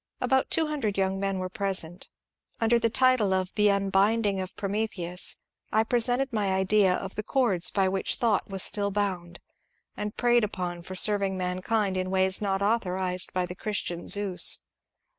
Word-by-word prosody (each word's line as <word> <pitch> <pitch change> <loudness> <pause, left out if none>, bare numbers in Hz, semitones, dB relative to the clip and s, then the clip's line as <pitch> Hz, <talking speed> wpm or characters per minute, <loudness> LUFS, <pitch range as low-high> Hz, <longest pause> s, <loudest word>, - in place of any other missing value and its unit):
About 265 0 +1
two 325 - +2
hundred 275 -10 -2
young 190 0 0
men 195 -1 -1
were 185 0 -3
present. 185 -3 -3 0.5
Under 235 +1 +3
title 230 -3 +3
of 185 -1 -1
'^ - - -18
The 210 -1 +3
Unbinding 200 +1 +1
of 185 - -7
Prometheus," 195 -4 -1 0.3
I 220 +1 +3
presented 245 +3 0
my 205 -3 0
idea 190 0 +3
of 190 0 -5
the - - -3
cords 215 -7 +1
by 195 -2 +1
which 190 0 0
Thought 225 -5 0
was 195 -1 +2
still 200 -1 +2
bound 190 -4 -3 0.6
and 210 0 -5
preyed 240 -1 +3
upon 180 -4 -4
for 185 +2 -8
serving 195 -1 +2
mankind 185 +2 -1
in 185 0 -2
ways 190 +1 +2
not 195 -1 -1
authorized 185 -4 -1
by 185 -1 -1
the 180 - -7
Christian 180 -3 -3
Zeus. 200 -3 0
195 Hz, 165 wpm, -27 LUFS, 185-215 Hz, 0.6 s, Under